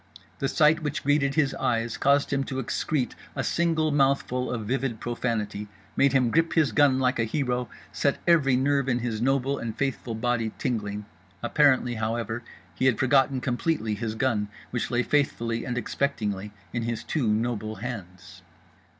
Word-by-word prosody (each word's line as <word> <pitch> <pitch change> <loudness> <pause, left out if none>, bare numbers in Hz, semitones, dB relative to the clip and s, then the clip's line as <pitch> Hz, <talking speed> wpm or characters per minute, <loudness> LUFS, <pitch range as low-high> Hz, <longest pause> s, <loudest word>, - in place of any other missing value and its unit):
The 135 - 0
sight 155 +3 +4
which 145 -2 -3
greeted 140 -1 +2
his 145 -4 +2
eyes 120 -3 -1
caused 140 +1 +2
him 135 0 +1
to 135 - -5
excrete 130 +1 -1 0.2
a 135 - -1
single 160 -1 +1
mouthful 135 -2 +1
of 115 -3 -3
vivid 125 -1 -1
profanity, 110 -4 -2 0.3
made 140 0 +4
him 125 -4 +3
grip 165 0 +2
his 155 -7 +3
gun 135 +3 +4
like 130 -1 +1
a - - +3
hero, 125 0 -1 0.2
set 140 - +1
every 155 -7 +4
nerve 135 +1 +2
in 120 - +2
his 115 -3 -3
noble 135 +2 +1
and 115 -2 -5
faithful 135 -4 -2
body 115 -1 -1
tingling. 105 -4 -2 0.4
Apparently 130 -1 +3
however 115 +1 -2 0.3
he 130 - +1
had 120 -5 +3
forgotten 135 0 +3
completely 120 -3 -1
his 110 +1 -3
gun, 110 -4 0 0.2
which 125 - -2
lay 120 0 +1
faithfully 115 -5 0
and 125 - -3
expectingly 105 -6 -2 0.2
in 120 - -1
his 115 0 -3
two 145 -7 -1
noble 110 -1 -1
hands. 95 -6 -8
125 Hz, 165 wpm, -26 LUFS, 115-140 Hz, 0.4 s, sight